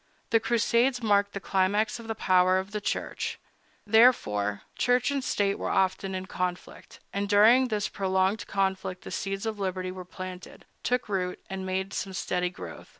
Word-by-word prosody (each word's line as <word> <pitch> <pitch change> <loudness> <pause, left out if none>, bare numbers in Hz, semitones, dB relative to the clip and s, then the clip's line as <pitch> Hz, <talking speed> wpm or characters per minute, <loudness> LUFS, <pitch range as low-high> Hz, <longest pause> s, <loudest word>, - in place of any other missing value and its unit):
The 225 - +5
Crusades 235 +2 +2
marked 205 -2 +2
the 200 - -3
climax 200 +4 +1
of 230 - -10
the 225 - -3
power 185 -1 +3
of 190 +2 -3
the 210 0 -3
Church. - - -3 0.5
Thereafter, 155 - +3
Church 245 +2 +2
and 280 -2 -1
State 200 -4 0
were - - -2
often 190 0 0
in 185 0 -4
conflict; 180 -2 -5
and 200 0 -2
during 225 +5 +6
this 210 -3 -1
prolonged 190 +1 0
conflict 190 -1 -1
the - - -8
seeds 195 +2 -3
of 220 -2 -3
liberty 185 -1 -2
were 185 0 -7
planted, 185 0 -9 0.2
took 250 0 0
root, 185 -3 -2
and 190 0 -4
made 190 +1 -2
some 195 - -3
sturdy 180 -1 -1
growth. 90 - -10
195 Hz, 170 wpm, -28 LUFS, 185-220 Hz, 0.5 s, during